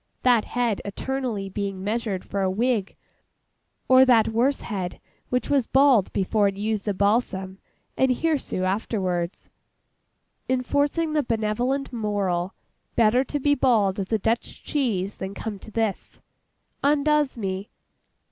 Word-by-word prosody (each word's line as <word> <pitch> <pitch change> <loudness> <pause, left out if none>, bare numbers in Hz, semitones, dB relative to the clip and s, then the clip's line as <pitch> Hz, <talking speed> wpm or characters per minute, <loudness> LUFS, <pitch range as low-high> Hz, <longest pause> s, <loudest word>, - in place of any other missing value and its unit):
That 245 -4 +4
head 240 -4 -1
eternally 230 -1 -3
being 195 -1 -4
measured 210 -3 -2
for 200 - -3
a 190 - +2
wig, 215 0 0 0.9
or 260 0 +7
that 240 -4 +4
worse 245 +5 +1
head 190 -5 -4 0.3
which 250 0 0
was 275 -5 +2
bald 265 -7 +4
before 205 +1 +1
it 195 0 -3
used 210 0 -2
the 205 - 0
balsam, 195 -2 0 0.4
and 265 - +3
hirsute 280 - -1
afterwards—enforcing 225 - -3
the 305 - +3
benevolent 240 +3 -1
moral, 195 -5 -1 0.4
'Better 235 +3 +4
to 290 - -3
be 285 +1 +3
bald 220 -8 +2
as 195 +1 -4
a 220 - +3
Dutch 225 +3 -2
cheese 210 -9 -1
than 190 +1 -5
come 210 -1 -5
to - - -12
this,'—undoes 280 +6 -2
me. 195 -1 -4
220 Hz, 130 wpm, -24 LUFS, 195-255 Hz, 0.9 s, or